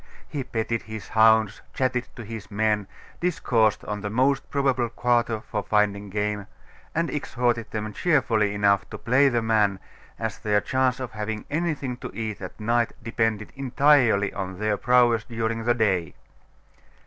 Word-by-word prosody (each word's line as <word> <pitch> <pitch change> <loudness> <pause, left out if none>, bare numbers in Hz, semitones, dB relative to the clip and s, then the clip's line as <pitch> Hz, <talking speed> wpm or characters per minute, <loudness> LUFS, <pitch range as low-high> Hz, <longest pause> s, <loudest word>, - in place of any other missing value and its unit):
He 140 -3 -4
petted 115 -2 -2
his 110 -1 -8
hounds, 110 -2 +4
chatted 125 -2 0
to 120 - -8
his 105 -2 -8
men, 105 -1 0 0.3
discoursed 125 - +1
on 105 0 -4
the 105 - -3
most 135 +5 +1
probable 135 -4 +1
quarter 120 -1 +1
for 105 - -3
finding 105 -1 +1
game, 105 0 -2 0.5
and 165 +1 +1
exhorted 120 -5 -1
them 110 -1 -4
cheerfully 115 - +2
enough 100 -2 +2
to - - -7
play 130 +4 +3
the 120 -3 0
man, 105 -3 +2 0.4
as 110 -2 -4
their 105 -1 +2
chance 130 +2 0
of 130 -3 -5
having 105 0 -4
anything 150 -6 -2
to - - -7
eat 110 -2 -4
at 90 +3 -8
night 115 +2 +1
depended 115 -2 -1
entirely 130 -6 +3
on 95 -1 -5
their 105 +1 0
prowess 120 -1 +3
during 115 -1 -3
the 120 0 +3
day. 95 -8 0
110 Hz, 155 wpm, -25 LUFS, 105-125 Hz, 0.5 s, hounds